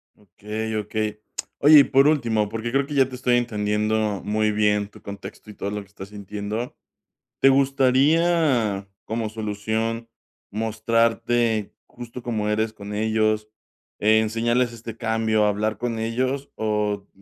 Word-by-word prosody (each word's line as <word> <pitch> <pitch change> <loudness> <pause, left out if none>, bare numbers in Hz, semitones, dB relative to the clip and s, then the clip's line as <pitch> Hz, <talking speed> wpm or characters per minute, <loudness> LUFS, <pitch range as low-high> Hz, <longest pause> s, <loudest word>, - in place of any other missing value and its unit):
Okey, 105 +3 -6
okey. 105 0 -3 0.4
Oye, 150 +1 +8
y - - +8
por 135 +1 +4
último, 115 -8 +1
porque 115 +2 -4
creo 135 +2 +2
que 150 - -6
ya 135 -2 +4
te 130 - -7
estoy 125 -1 +2
entendiendo 105 -2 0
muy 110 +1 +1
bien 105 -1 +2
tu - - -16
contexto 100 +1 -9
y - - -9
todo 100 - -4
lo 105 0 -3
que 100 - -15
estás 100 0 -11
sintiendo, 105 +3 -5 0.6
¿te 135 - +6
gustaría 135 - +3 0.2
como 110 0 -2
solución 110 +2 -3 0.4
mostrarte 115 0 +1
justo 120 0 -9
como 110 -3 -1
eres 110 +1 0
con 100 -1 -8
ellos, 110 0 +1 0.5
eh, 110 +1 +4
enseñarles 115 +2 +1
este 115 -1 -8
cambio, 110 -2 +1
hablar 105 +1 0
con 115 0 -3
ellos, 130 +5 -2
o 105 -2 -1
110 Hz, 145 wpm, -23 LUFS, 105-120 Hz, 0.6 s, Oye